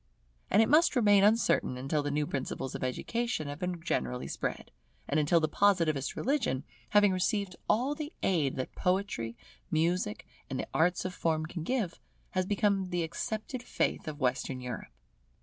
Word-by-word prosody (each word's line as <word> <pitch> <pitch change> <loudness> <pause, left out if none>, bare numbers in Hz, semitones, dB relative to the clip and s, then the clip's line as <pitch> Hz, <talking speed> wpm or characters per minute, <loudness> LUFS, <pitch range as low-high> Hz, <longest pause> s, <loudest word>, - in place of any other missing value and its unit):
And 210 +3 +6
it - - +1
must 310 +1 +5
remain 205 -5 +5
uncertain 210 - +3
until 135 +4 0
the 145 - -2
new 150 +1 0
principles 135 -1 -3
of - - -4
education 195 - -2
have 145 +1 -6
been 180 -1 -2
generally 125 -7 -1
spread, - - -4 0.4
and 150 - +2
until 155 +3 +4
the 155 - +1
Positivist 165 -6 +2
religion, 240 - 0 0.3
having 205 -1 +5
received 190 0 0
all 255 +6 +2
the 300 0 -5
aid 155 -8 +2
that 130 - -4
Poetry, 180 - -1 0.3
Music, 165 - 0 0.2
and - - -3
the - - -2
arts 175 +3 +2
of 185 - -2
Form 160 -3 0
can 165 +1 -6
give, 205 -1 -1 0.3
has 185 -1 0
become 200 -2 +1
the 175 -1 0
accepted 215 +9 -4
faith 245 - -1
of 155 -1 -5
Western 130 0 0
Europe. 125 -2 -6
175 Hz, 165 wpm, -31 LUFS, 145-205 Hz, 0.4 s, And